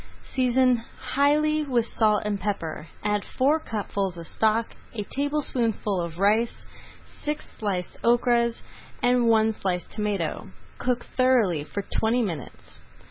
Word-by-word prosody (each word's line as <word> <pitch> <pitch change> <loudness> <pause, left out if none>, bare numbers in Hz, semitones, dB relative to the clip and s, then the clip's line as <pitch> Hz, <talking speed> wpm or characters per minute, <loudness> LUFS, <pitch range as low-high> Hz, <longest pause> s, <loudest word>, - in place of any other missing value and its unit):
Season 255 -1 +3 0.4
highly 300 +2 +3
with 245 -5 +1
salt 215 -2 +2
and 205 -1 -1
pepper, 170 -6 -3 0.2
add 210 -1 +1
four 285 +5 +2
cupfuls 200 - -3
of 170 - -7
stock, 220 +5 +1 0.2
a 210 - -2
tablespoonful 250 -9 0
of 170 -1 -5
rice, 215 +5 +2 0.6
six 300 +1 -3
sliced 190 -5 -3
okras, 235 0 +3 0.4
and 245 -1 +4
one 220 -1 +4
sliced 180 -4 -3
tomato. 205 -6 -2 0.3
Cook 250 -1 0
thoroughly 235 - +2
for 200 +6 -5 0.2
twenty 235 +2 +2
minutes. 165 - -7
225 Hz, 125 wpm, -26 LUFS, 200-250 Hz, 0.6 s, and